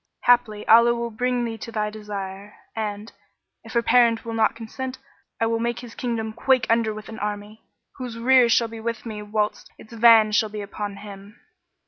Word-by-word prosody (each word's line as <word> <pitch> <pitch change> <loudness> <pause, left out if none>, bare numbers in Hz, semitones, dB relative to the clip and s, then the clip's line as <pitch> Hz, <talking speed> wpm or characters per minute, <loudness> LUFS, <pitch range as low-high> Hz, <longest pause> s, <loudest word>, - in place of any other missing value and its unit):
Haply 240 -4 +2
Allah 235 +1 +6
will 235 0 -4
bring 245 +2 -1
thee 225 -1 -5
to 230 - -8
thy 210 -1 -2
desire; 205 -1 -7 0.2
and, 210 0 -4 0.5
if - - -11
her 235 -1 +2
parent 235 -2 +3
will 230 - -5
not 225 0 +2
consent, 255 +3 -6 0.4
I 225 - +2
will 225 0 0
make 235 +1 -2
his 240 -2 -11
kingdom 225 -3 -3
quake 260 +2 +2
under 230 -1 +2
him 215 - -4
with 215 0 -9
an 220 - -8
army, 210 +1 -5 0.4
whose 250 -3 -6
rear 250 0 +5
shall 230 0 +3
be 225 0 -9
with 230 +1 -4
me 215 -2 -6
whilst 210 0 -2
its 220 - -15
van 225 -2 +6
shall 215 +1 +2
be 210 0 -6
upon 205 0 -6
him." 200 +1 -12
225 Hz, 195 wpm, -23 LUFS, 210-235 Hz, 0.5 s, Allah